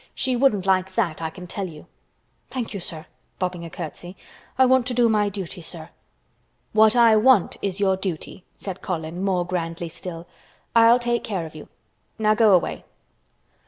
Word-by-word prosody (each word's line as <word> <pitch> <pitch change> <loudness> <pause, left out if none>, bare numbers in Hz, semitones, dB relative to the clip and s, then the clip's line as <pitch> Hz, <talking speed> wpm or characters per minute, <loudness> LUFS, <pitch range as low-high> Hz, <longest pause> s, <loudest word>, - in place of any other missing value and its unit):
"She 260 -1 0
wouldn't 235 -7 +2
like 190 0 +1
that, 165 -2 0
I 160 - -2
can 180 +3 -10
tell 190 +1 -4
you." 155 -2 -12 0.6
"Thank 245 -4 -4
you, 200 - -4
sir," 160 -3 -6 0.3
bobbing 180 -2 -3
a 170 - -7
curtsy, 175 +3 -8 0.4
"I 260 - +6
want 255 -1 +3
to 250 - -2
do 240 -1 +4
my 210 -2 +2
duty, 190 -2 -6
sir." 160 0 -7 0.8
"What 220 +1 +5
I 230 -2 +6
want 215 -2 +4
is 195 -1 -3
your 195 -2 +3
duty" 185 -1 -5
said 190 -2 -7
Colin 170 0 -4
more 185 -3 +1
grandly 170 -1 -3
still. 165 0 -8 0.5
"I'll 230 +1 +7
take 240 -1 -1
care 190 -6 -3
of 160 - -10
you. 155 - -10 0.5
Now 215 -1 +3
go 215 -2 +5
away." 175 - -1
190 Hz, 175 wpm, -23 LUFS, 170-220 Hz, 0.8 s, I'll